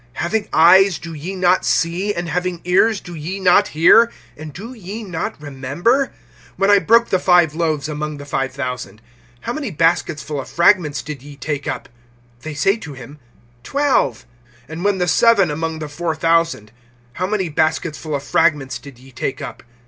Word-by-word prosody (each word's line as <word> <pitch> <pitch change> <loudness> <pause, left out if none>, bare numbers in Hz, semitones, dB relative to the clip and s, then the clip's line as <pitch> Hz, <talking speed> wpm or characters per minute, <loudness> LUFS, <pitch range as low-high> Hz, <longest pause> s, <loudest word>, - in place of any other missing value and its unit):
(18)Having 205 +4 -1
eyes, 185 +3 +6
do 165 0 -9
ye 165 +6 -6
not 185 0 +2
see? 175 +5 0
And 175 -3 -4
having 175 +1 -2
ears, 195 +4 +3
do 175 - -10
ye 170 +5 -5
not 180 -2 +4
hear? 225 +9 +5 0.2
And 155 0 -9
do 215 - -9
ye 215 0 -8
not 180 -7 -5
remember? 150 - -1 0.5
(19)When 195 +1 +3
I 205 - +6
broke 230 +3 +3
the 185 - +2
five 175 -4 +4
loaves 155 -3 -1
among 150 0 -4
the 145 - -9
five 135 -1 -2
thousand, 125 -4 -6 0.4
how 235 - -4
many 285 -4 -4
baskets 165 -2 0
full 145 -2 -4
of - - -11
fragments 170 -5 +2
did 150 -4 -7
ye 145 +1 -12
take 145 +1 -4
up? 130 - -4 0.5
They 155 +1 -7
say 195 +8 +2
to 160 -9 -9
him: 135 +3 -12 0.4
Twelve. 265 - 0 0.4
(20)And 160 +4 -7
when 200 -1 +2
the 180 -1 0
seven 200 -5 +4
among 160 +1 -3
the 155 -1 -5
four 160 +2 -3
thousand, 165 -9 +1 0.4
how 185 +7 -2
many 200 -3 -1
baskets 155 0 -1
full 155 -2 -4
of 140 - -4
fragments 145 -5 +1
did 140 -4 -13
ye 130 +2 -17
take 130 +1 -4
up? - - -7
165 Hz, 185 wpm, -19 LUFS, 145-190 Hz, 0.5 s, eyes